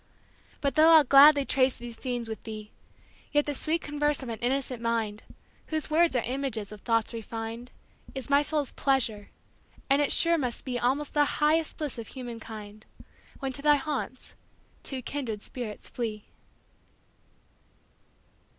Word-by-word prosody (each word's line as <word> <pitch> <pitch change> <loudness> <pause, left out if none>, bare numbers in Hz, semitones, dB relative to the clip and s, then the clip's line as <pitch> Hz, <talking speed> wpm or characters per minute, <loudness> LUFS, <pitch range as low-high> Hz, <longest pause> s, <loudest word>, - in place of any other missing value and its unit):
But 280 -1 +1
though 315 +1 +6
I'll 320 -2 +9
gladly 280 +1 +7
trace 265 -1 +2
these 240 -1 -9
scenes 245 -2 -3
with 220 -1 -6
thee, 215 -1 -8 0.6
Yet 295 0 +3
the 290 - -2
sweet 320 +4 -1
converse 295 -1 0
of 250 - -6
an 225 -2 -5
innocent 255 0 -1
mind, 225 -2 -1 0.5
Whose 310 -1 -3
words 330 -2 +4
are 240 - +2
images 245 -5 -3
of 210 -1 -10
thoughts 230 -1 0
refin'd, 225 +1 -6 0.5
Is 265 -3 -5
my 280 0 +4
soul's 295 -2 -1
pleasure; 235 -7 0 0.6
and 280 +1 +5
it 290 - +1
sure 335 -1 +3
must 250 -4 -3
beAlmost 255 +3 0
the 295 -1 +4
highest 310 +1 +2
bliss 295 -6 -4
of 225 - -7
human 245 -3 -7
kind, 215 -1 -10 0.6
When 270 -1 -2
to 280 - -6
thy 295 0 +5
haunts 275 -2 -4 0.5
two 260 -2 -4
kindred 230 -8 -4
spirits 240 -5 -7
flee. 220 -4 -4
260 Hz, 150 wpm, -28 LUFS, 230-290 Hz, 0.6 s, I'll